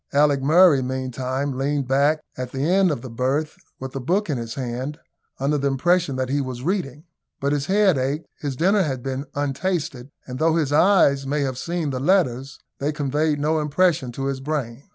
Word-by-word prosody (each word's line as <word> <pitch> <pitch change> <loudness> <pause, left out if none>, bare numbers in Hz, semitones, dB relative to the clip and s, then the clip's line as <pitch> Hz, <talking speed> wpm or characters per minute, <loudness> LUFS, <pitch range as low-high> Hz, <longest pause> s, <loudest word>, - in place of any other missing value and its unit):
Alick 145 -1 +3
Murray 155 0 +5
meantime 130 +1 -3
leaned 140 0 -1
back 140 +4 +2
at 125 -1 -5
the 135 - -4
end 185 +4 +3
of 145 -7 -3
the 130 - -7
berth, 135 +6 -1 0.2
with 130 0 -7
a - - -2
book 175 +8 0
in 135 - -1
his 115 -1 -6
hand, 130 +3 -4 0.4
under 145 +2 +1
the 140 - 0
impression 165 +2 +1
that 130 0 -2
he 140 +1 +1
was 130 -2 -5
reading; 155 -5 -2 0.4
but 140 -1 0
his 145 0 -1
head 195 -6 +3
ached; 140 +5 -2
his 140 -3 -3
dinner 195 +8 +3
had 135 -8 -2
been 135 +2 -4
untasted, 145 -2 -2 0.2
and, 125 0 -7
though 160 0 +3
his 150 -4 0
eyes 145 -5 +4
may 145 +2 0
have 130 -2 -2
seen 170 -2 -2
the 130 - -3
letters, 135 -5 +1 0.2
they 145 +2 0
conveyed 150 0 0
no 155 +2 +1
impression 150 -2 +1
to 135 +2 -4
his 135 -1 -2
brain. 135 -3 -4
140 Hz, 195 wpm, -23 LUFS, 130-155 Hz, 0.4 s, Murray